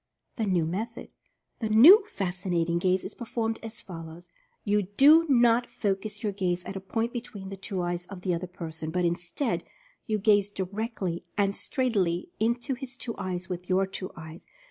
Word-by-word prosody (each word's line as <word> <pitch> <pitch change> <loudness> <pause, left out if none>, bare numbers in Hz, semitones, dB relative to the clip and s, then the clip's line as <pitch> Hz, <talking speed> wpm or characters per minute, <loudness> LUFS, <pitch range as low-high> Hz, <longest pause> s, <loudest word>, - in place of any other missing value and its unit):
THE 220 -3 0
NEW 180 -4 +2
METHOD. 220 +8 -4 0.5
The 220 - -2
new 310 - +9
"Fascinating 175 - -1
Gaze" 185 +1 +2
is - - -5
performed 225 -1 -3
as 225 -1 -8
fol 165 -4 -8
lows: 170 +2 -12 0.3
You 210 0 +2
do 280 - +6
not 240 -2 +4
focus 200 +2 -2
your 210 - 0
gaze 180 -3 -1
at 195 - -7
a - - -3
point 225 +5 -2
between 215 -6 -6
the 195 - -5
two 190 -1 -4
eyes 175 0 -3
of 195 -2 -9
the 180 -1 0
other 175 +2 -3
person, 160 -3 -6
but, 180 +2 0
instead, 175 - -1 0.4
you 215 -2 +1
gaze 205 -1 +3
directly 195 -2 -3
and 200 -1 +2
straightly 195 -10 0
into 235 +5 0
his 260 0 -7
two 230 -2 -5
eyes 185 -2 -3
with 180 -1 -6
your 190 +1 +3
two 190 -1 -5
eyes. 160 0 -10
195 Hz, 180 wpm, -28 LUFS, 180-225 Hz, 0.5 s, new